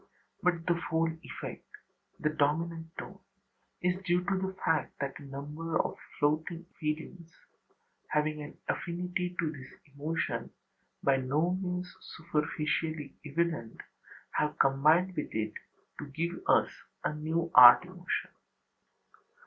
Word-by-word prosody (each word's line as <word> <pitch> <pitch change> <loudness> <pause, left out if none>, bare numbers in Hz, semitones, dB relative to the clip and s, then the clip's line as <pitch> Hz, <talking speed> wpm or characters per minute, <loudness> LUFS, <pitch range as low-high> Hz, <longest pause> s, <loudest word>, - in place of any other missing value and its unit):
But 175 -2 +1
the 175 - +4
whole 165 -1 0
effect, - - -7 0.5
the 155 - +1
dominant 160 +3 0
tone, 195 +1 -7 0.6
is 180 +1 +1
due 180 -1 +2
to 195 +1 0
the 190 0 -2
fact 160 - +1
that 135 -1 -3
a - - -12
number 150 +4 -4
of - - 0 0.2
floating 160 +3 0
feelings, 160 +2 -4 0.8
having 150 0 0
an 145 - -9
affinity 180 +1 -2
to 160 -3 0
this 130 -4 -10 0.2
emotion 150 +3 -2 0.5
by 135 -1 +4
no 145 +7 +1
means 180 -1 -3
superficially 155 -1 -2
evident, 155 -6 -1 0.5
have 150 0 0
combined 155 +7 +4
with 150 - -4
it 110 -1 -1 0.5
to 150 - -5
give 165 +5 -3
us - - +4 0.3
a - - 0
new 160 +2 -1
art 125 +5 +11
emotion. 180 0 -3
160 Hz, 125 wpm, -31 LUFS, 150-175 Hz, 0.8 s, art